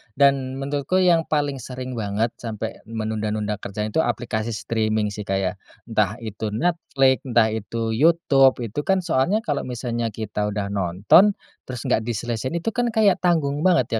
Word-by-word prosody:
Dan 135 -2 +3
menurutku 145 +7 0
yang 170 -3 +3
paling 145 -3 0
sering 125 -1 -6
banget 105 +2 -1
sampai 110 -1 -5
menunda-nunda 110 -2 -2
kerjaan 105 +2 -4
tuh 160 - +1
aplikasi 115 -2 -2
streaming 110 -2 -1
sih 105 0 -7
kayak 95 -1 -1 0.2
entah 105 -3 0
itu 110 0 -4
Netflix, 135 0 +1
entah 115 -3 +3
itu 110 +1 -3
YouTube, 135 -1 +4
itu 115 +4 -4
kan 190 -2 +2
soalnya 175 +7 +1
kalau 145 -7 -2
misalnya 120 -1 -2
kita 105 -1 -2
udah 100 -1 -3
nonton, 100 - +4 0.3
terus 125 -2 -6
nggak - - +2
diselesain 120 +4 -3
itu 170 +7 -1
kan 245 +1 0
kayak 215 -4 +3
tanggung 155 -5 +1
banget 125 -10 +2
120 Hz, 155 wpm, -23 LUFS, 110-145 Hz, 0.3 s, YouTube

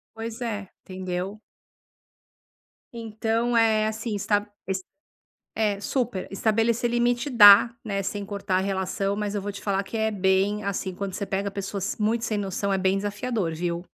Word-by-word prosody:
Pois 225 +1 -6
é, 205 -5 -3 0.2
entendeu. 185 +2 -4 1.5
Então, 230 +1 -1
eh, 220 -1 +4
assim, 220 0 -3
está 205 +1 0 0.2
es 190 0 -2 0.7
é, 210 -2 0
super, 235 -3 -2
estabelecer 225 +4 +1
limite 240 +2 +1
dá, 230 -2 +8
né, 200 -2 -2
sem 200 +1 -3
cortar 195 -2 -1
relação, 195 +1 -1
mas 210 -1 -2
eu 205 - -2
vou 205 - -3
te 200 - -8
falar 195 -1 0
que 200 +3 -7
é 220 0 +1
bem, 195 +1 +1
assim, 195 -1 -2
quando 195 0 -4
você 200 +2 -4
pega 195 +1 -2
pessoas 195 0 -4
muito 225 +2 +1
sem 215 -3 -1
noção, 200 0 -2
é 195 - +1
bem 190 +1 +2
desafiador, 205 -2 -2
viu. 170 +1 -3
205 Hz, 160 wpm, -25 LUFS, 195-225 Hz, 1.5 s, dá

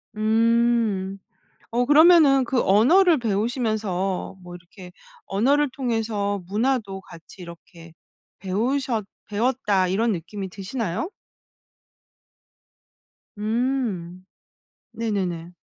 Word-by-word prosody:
음. 220 -3 +1 0.5
어 245 +2 +1
그러면은 295 -2 +6
그 250 0 0
언어를 315 - +4
배우시면서 215 -5 -2
뭐 175 0 -10
이렇게 180 +1 -13 0.3
'언어를 275 +9 +1
통해서 225 -6 -2
문화도 210 -2 -1
같이 170 0 -15
이렇게 170 -1 -13 0.5
배우셨 225 +4 -1 0.2
배웠다.' 210 -4 0
이런 220 +5 +1
느낌이 190 +2 -5
드시나요? 200 - -4 2.3
음 215 -6 -2 0.7
네네네. 185 -7 -3
215 Hz, 200 characters per minute, -23 LUFS, 190-245 Hz, 2.3 s, 그러면은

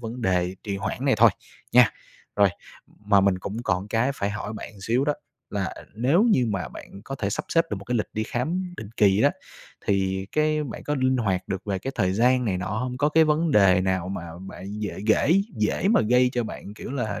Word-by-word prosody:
vấn 120 +1 -6
đề 90 -2 +1
trì 100 -2 -3
hoãn 100 +6 -4
này 135 - +4
thôi, 115 0 +7 0.4
nha. 125 -2 +7 0.5
Rồi, 100 -1 +5 0.6
mà 100 -2 +5
mình 95 -1 +2
cũng 105 +5 -5
còn 95 0 -1
cái 115 +5 +1
phải 100 -4 -2
hỏi 105 0 -5
bạn 110 - -8
một 105 - -16
xíu 120 +6 +1
đó, 150 0 +1 0.4
là 100 -2 -2 0.2
nếu 130 - +3
như 170 - +3
mà 95 - -2
bạn 100 +9 -11
có 135 - -5
thể 100 -7 -2
sắp - - -3
xếp 165 0 +3
được 105 - -1
một 100 - -9
cái 125 - -1
lịch 110 - 0
đi 110 - -1
khám 175 +11 -3
định 110 - -7
kỳ 100 0 +4
á - - +5 0.6
thì 95 -1 0
cái 155 0 +1
bạn 130 - -7
có 150 - -1
linh 130 -1 +2
hoạt 95 -6 -1
được 95 - -3
về 100 -2 -2
cái 135 +7 -5
thời 95 0 +1
gian 125 +4 +3
này 95 -5 0
nọ 90 - -4
hông? 125 +5 -3
Có 145 - +3
cái 160 +1 +5
vấn 155 +2 +1
đề 95 -7 +5
nào 95 -1 -1
mà 95 -2 -4 0.2
bạn 95 +2 -8
dễ 105 - -3
ghễ 115 +7 +4 0.2
dễ 105 - +1
mà 225 - +5
gây 125 +3 +3
cho 120 -2 0
bạn, 105 -1 -8
kiểu 120 - -8
là, 110 -7 -2
110 Hz, 235 wpm, -25 LUFS, 100-130 Hz, 0.6 s, thôi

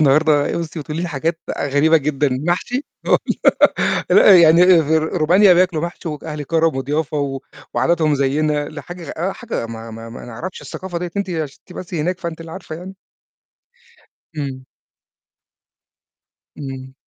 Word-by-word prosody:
النهارده 150 +1 +3
بُصّي 165 -1 -5
بتقولي 150 +3 -4
لي 175 - -2
حاجات 165 +2 -2
بقى 145 - -2
غريبة 150 +4 +4
جدًا، 150 -1 0
المحشي! 175 - -1 0.2
هو - - +4 0.9
لأ، 200 - +8
يعني 165 +1 +6 0.2
أ - - +1
فر 160 +1 +2 0.2
رومانيا 180 +5 +5
بياكلوا 175 -3 +2
محشي 170 0 -5
وج 150 -2 -6
أهل 150 -2 -5
كرم 160 0 +1
وضيافة 145 +3 -2
و 135 -2 -2 0.3
وعاداتهم 160 -3 +2
زيّنا 145 +2 0
لا 150 -1 -8
حاجة 175 +2 -9
غ - - -6
آه، 180 +4 -1
حاجة 235 - -5
ما 115 0 -8
ما 115 +1 -9
ما 115 - -9
نعرفش 125 +11 -7
الثقافة 185 -2 -6
دِيّة 175 0 -4
أنتِ 200 -2 -2
عشان 155 -5 -4
أنتِ 180 - -11
بس 180 0 -7
هناك 175 +3 -1
فأنتِ 170 -1 -5
اللي 165 0 -9
عارفة 180 -4 -7
يعني. 185 +3 -9 1.4
إمم. 135 -3 -5 1.9
إمم. 135 -2 -7
155 Hz, 160 wpm, -19 LUFS, 145-175 Hz, 1.9 s, لأ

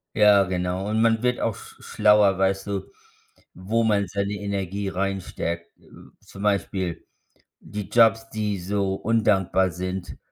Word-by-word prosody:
Ja, 105 -2 +6
genau. 90 +1 -2
Und 110 +1 +1
man 115 0 +2
wird 125 0 +1
auch 110 - -1
sch - - -14
schlauer, 105 -2 +3
weißt 95 +1 0
du, 100 -1 -4 0.6
wo 110 +6 -1
man 100 -3 +2
seine 100 +2 -2
Energie 100 -1 -3
reinsteckt. 90 -3 -3
Äh, - - -24 0.3
zum 100 - -11
Beispiel 95 -4 -1 0.5
die 105 -2 -7
Jobs, 115 0 +4
die 105 -3 -2
so 95 +1 -1
undankbar 95 -4 +1
sind 90 +2 -5
100 Hz, 140 wpm, -24 LUFS, 95-105 Hz, 0.6 s, Ja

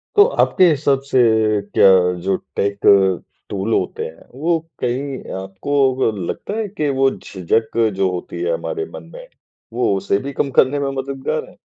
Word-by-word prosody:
तो 410 - +8 0.2
आपके 185 -2 +4
हिसाब 140 -3 +1
से 130 - +3 0.6
क्या - - +7 0.3
जो 95 +1 0 0.2
टेक 100 0 -1 0.7
टूल 100 +3 -2
होते - - -1
हैं, 80 +1 -11
वो 165 +2 +1 0.2
कहीं 130 +2 -2 0.2
आपको 95 +9 -5 0.2
ग 120 -4 +1 0.2
लगता - - -5
है 220 -2 -2
कि 150 -1 0
वो 135 0 +5
झिझक 110 +5 -2 0.2
जो 95 -1 +1
होती 90 - -6
है 455 +7 0
हमारे 430 -4 -3
मन - - -8
में - - -10 0.5
वो 120 -5 +1
उसे 100 - 0
भी 140 - -5
कम 140 - -1
करने 135 +2 +3
में 140 -1 -1
मददगार 135 0 -4
है? - - -20
135 Hz, 170 wpm, -19 LUFS, 100-150 Hz, 0.7 s, तो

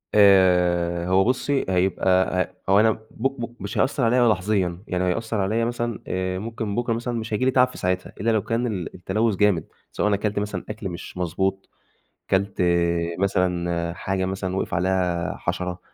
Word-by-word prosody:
آآ 90 -3 +4
هو 95 +1 +4
بُصّي 130 +4 0
هيبقى 95 0 +2 0.4
ه - - +3
هو 100 - +6
أنا 110 +1 +5
بُ - - -5
بُ 120 -1 -3
مش 100 +1 -5
هيأثّر 135 -1 +1
عليّا 120 +1 +4
لحظيًا، 95 -3 0
يعني 90 0 -1
هيأثّر 110 +5 -1
عليّا 110 +4 +1
مثلًا 120 -1 -2
آآ 95 0 -2
ممكن 110 -1 -4
بكرة 120 0 0
مثلًا 120 +1 -3
مش 110 0 -5
هييجي 115 +5 +1
لي 130 - +3
تعب 125 0 +5
في 125 - -12
ساعتها، 90 0 -2
إلّا 115 +2 +2
لو 110 - +2
كان 115 +2 -1
ال 95 -7 -4
التلوث 105 +4 0
جامد 100 -3 +2 0.2
سواء - - 0
أنا 105 - +3
كلت 105 0 -1
مثلًا 105 0 -3
أكل 95 - -5
مش 90 +1 -8
مضبوط، 95 +2 -2 0.6
كلت 95 0 +1 0.6
مثلًا 85 -3 0
حاجة 95 +1 -2
مثلًا 95 0 -3
وقِف 95 - -2
عليها 90 -1 0
حشرة، 90 0 -3
95 Hz, 175 wpm, -23 LUFS, 90-115 Hz, 0.6 s, هو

